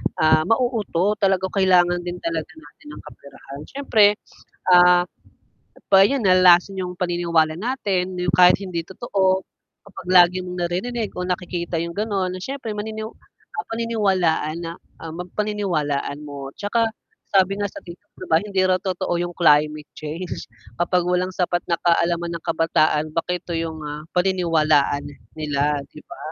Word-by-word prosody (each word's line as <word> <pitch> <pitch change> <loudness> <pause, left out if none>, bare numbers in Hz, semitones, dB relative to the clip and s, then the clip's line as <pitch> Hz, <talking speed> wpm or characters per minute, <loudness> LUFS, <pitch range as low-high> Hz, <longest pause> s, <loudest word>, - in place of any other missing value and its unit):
ah, 155 0 +4
mauuto 215 -5 0
talaga 190 -2 +1
kailangan 180 -3 +3
din 175 0 -5
talaga 165 -2 -2
natin 160 - -18
ng - - -10
kaperahan 140 0 -12
syempre, 265 -6 +3 0.6
ah, 180 0 +7 0.9
pa 195 0 +8
yun 270 -4 -1
nalalason 185 0 +5
yung 180 -1 -4
paniniwala 170 -3 0
natin 195 -7 -2
na 180 0 -3
yung 170 - +1
kahit 180 0 +7
hindi 180 -3 -4
totoo 190 -2 0 0.4
kapag 190 -2 -12
lagi 180 0 +6
mong 180 0 -6
naririnig 220 +5 -3
o 180 - -2
nakikita 180 -1 -3
yung 170 - -5
ganon 200 -3 -1
na 185 - -6
siyempre 260 +2 -5
manini 215 +1 -5 0.7
paniniwalaan 195 -9 0
na, 165 0 -5 0.3
ang 165 +1 -7
mag 180 - -5
paniniwalaan 175 -10 -1
mo 140 -2 -7
tsaka 225 +3 0 0.4
sabi 195 0 +2
nga 205 - -1
sa - - -13
Tiktok 175 +4 -13
di - - -8
ba 160 - +5
hindi 200 -2 -1
raw 185 0 +3
totoo 185 -2 -2
yung 175 0 -4
climate 150 -2 +3
change 160 +4 -6 0.3
kapag 180 0 +1
walang 180 +1 0
sapat 175 -1 0
na 170 - +2
kaalaman 170 0 +1
ang 165 - -6
kabataan 165 -2 +1
bakit 175 +2 -2
ito 170 - -5
yung 165 -1 -4
mga 150 0 -5 0.2
paniniwalaan 165 -6 +2 0.3
nila, 150 -1 0 0.2
di 150 - -11
ba? - - -11
180 Hz, 155 wpm, -22 LUFS, 165-195 Hz, 0.9 s, pa